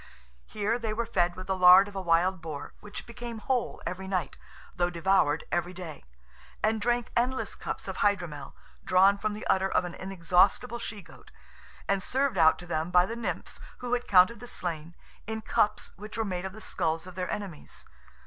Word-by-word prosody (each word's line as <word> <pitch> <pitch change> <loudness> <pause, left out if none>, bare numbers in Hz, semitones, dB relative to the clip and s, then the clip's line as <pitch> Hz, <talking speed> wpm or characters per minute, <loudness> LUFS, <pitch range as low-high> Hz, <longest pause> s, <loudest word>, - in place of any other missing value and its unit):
Here 215 +3 -1
they 220 -2 -2
were 235 +1 -1
fed 175 -4 +1
with 185 - -7
the 190 - -1
lard 185 +2 +8
of 205 - -11
a 195 - -2
wild 175 +1 +2
boar, 155 -3 -7
which 205 0 -8
became 235 0 -7
whole 245 +3 -2
every 190 +1 -4
night, 185 -3 -2 0.4
though 175 0 +1
devoured 170 -3 +2
every 175 +1 -1
day, 170 -5 -8 0.6
and 220 0 +2
drank 240 +2 0
endless 255 +2 0
cups - - -6
of - - -5
hydromel, 175 -9 -1 0.3
drawn 195 +2 +4
from 215 0 -1
the 210 - -7
udder 190 0 +2
of 180 - +1
an 175 - -6
inexhaustible 195 +6 +1
she 210 -4 -6
goat, - - -16 0.6
and 200 -1 +1
served 260 -2 0
out 160 -1 +6
to 175 - -10
them 160 -1 -2
by 180 0 +5
the 230 - -5
Nymphs, 235 -1 -4 0.2
who 245 0 -4
had 245 0 -1
counted 190 +4 +5
the 245 - -9
slain, 170 -6 -5 0.3
in 220 0 -4
cups 215 -1 +1
which 210 +2 -8
were 225 - 0
made 185 -2 -3
of 190 - -5
the 215 - -11
skulls 165 -4 -2
of 185 - -10
their 180 0 -4
enemies. 190 -7 -6
190 Hz, 195 wpm, -28 LUFS, 175-215 Hz, 0.6 s, lard